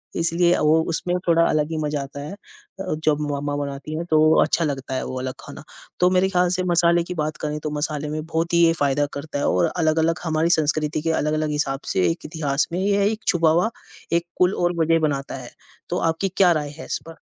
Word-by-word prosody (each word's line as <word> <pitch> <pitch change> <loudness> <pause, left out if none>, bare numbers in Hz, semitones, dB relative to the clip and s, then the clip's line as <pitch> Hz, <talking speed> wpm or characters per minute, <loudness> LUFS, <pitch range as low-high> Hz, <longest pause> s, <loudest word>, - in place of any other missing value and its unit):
इसलिए 170 +1 +2
वो 155 +1 +3
उसमें 175 +2 -1
थोड़ा 165 0 +4
अलग 155 +1 0
ही 160 - -2
मज़ा 150 -1 -1
आता 140 +1 -9
है। 150 +6 -7
अ, 195 -2 -9
जब 150 -1 +3
मम्मा 145 0 -2
बनाती 140 +2 -6
है 170 - -2
तो 155 - +5 0.2
अच्छा 165 - +1
लगता 135 -2 -4
है - - -2
वो 130 - -4
अलग 130 0 -4
खाना, - - -10 0.4
तो 180 0 +5
मेरे 185 +1 +2
ख़्याल 180 -2 +2
से 185 - -1
मसाले 170 0 +3
की 180 - -6
बात 150 0 -4
करें 150 0 -2
तो 150 - -2
मसाले 150 0 -2
में 155 0 -4
बहुत 165 +1 -2
ही 170 - +5
ये 165 - +4
फ़ायदा 145 +1 +2
करता 145 0 -5
है - - 0
और 90 - +2
अलग-अलग 160 +1 +1
हमारी 160 0 +1
संस्कृति 150 0 0
के 165 +1 0
अलग-अलग 155 0 0
हिसाब 145 -2 -1
से 90 -1 +2
एक - - -7
इतिहास 150 -2 -1
में 175 - -1
यह 200 +1 +2
एक 220 0 -6
छुपा 165 -3 +3
हुआ 175 +7 +2 0.4
एक 170 0 +2
कुल 180 +1 +3
और 175 0 +1
वजह 165 +1 +3
बनाता 140 -2 -3
है। 125 -2 -9 0.4
तो - - -1
आपकी 190 +4 -2
क्या 185 -3 +6
राय 150 -2 -2
है - - -7
इस - - -3
पर? 165 - -10
155 Hz, 230 wpm, -22 LUFS, 145-170 Hz, 0.4 s, क्या